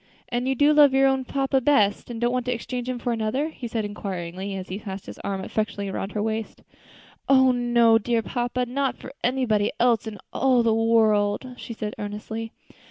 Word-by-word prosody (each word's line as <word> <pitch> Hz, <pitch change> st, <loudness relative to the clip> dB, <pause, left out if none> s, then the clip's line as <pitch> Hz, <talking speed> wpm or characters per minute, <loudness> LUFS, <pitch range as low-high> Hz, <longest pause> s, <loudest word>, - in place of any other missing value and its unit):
"And 245 Hz, +1 st, -1 dB
you 265 Hz, -, +1 dB
do 290 Hz, +4 st, +4 dB
love 290 Hz, -3 st, +6 dB
your 270 Hz, 0 st, +5 dB
own 265 Hz, -1 st, +2 dB
papa 270 Hz, 0 st, 0 dB
best, 215 Hz, -8 st, +2 dB
and 235 Hz, -2 st, -5 dB
don't 240 Hz, +1 st, +1 dB
want 250 Hz, -1 st, -2 dB
to -, -, +1 dB
exchange 245 Hz, +1 st, -4 dB
him 255 Hz, -, -2 dB
for 240 Hz, 0 st, -2 dB
another?" 230 Hz, +7 st, -1 dB
he 255 Hz, -6 st, -7 dB
said, 225 Hz, -2 st, -2 dB
inquiringly, 195 Hz, -1 st, -5 dB
as 185 Hz, -1 st, -6 dB
he 190 Hz, +2 st, -4 dB
passed 195 Hz, -3 st, -7 dB
his -, -, -10 dB
arm 195 Hz, -1 st, -3 dB
affectionately 200 Hz, -2 st, -2 dB
around 195 Hz, +1 st, -4 dB
her 210 Hz, -, -1 dB
waist. 220 Hz, 0 st, -4 dB, 0.7 s
"Oh! 260 Hz, -1 st, +6 dB
no, 240 Hz, -2 st, +4 dB
dear 230 Hz, +1 st, 0 dB
papa, 245 Hz, +1 st, -2 dB
not 270 Hz, +2 st, -1 dB
for 265 Hz, -, -10 dB
anybody 235 Hz, -5 st, +1 dB
else 235 Hz, -2 st, +3 dB
in 215 Hz, -1 st, -6 dB, 0.2 s
all 255 Hz, -3 st, +3 dB
the 225 Hz, -1 st, +3 dB
world," 225 Hz, +1 st, +2 dB
she 240 Hz, -, -8 dB
said 215 Hz, -1 st, -5 dB
earnestly. 215 Hz, +2 st, -5 dB
230 Hz, 200 wpm, -24 LUFS, 210-255 Hz, 0.7 s, love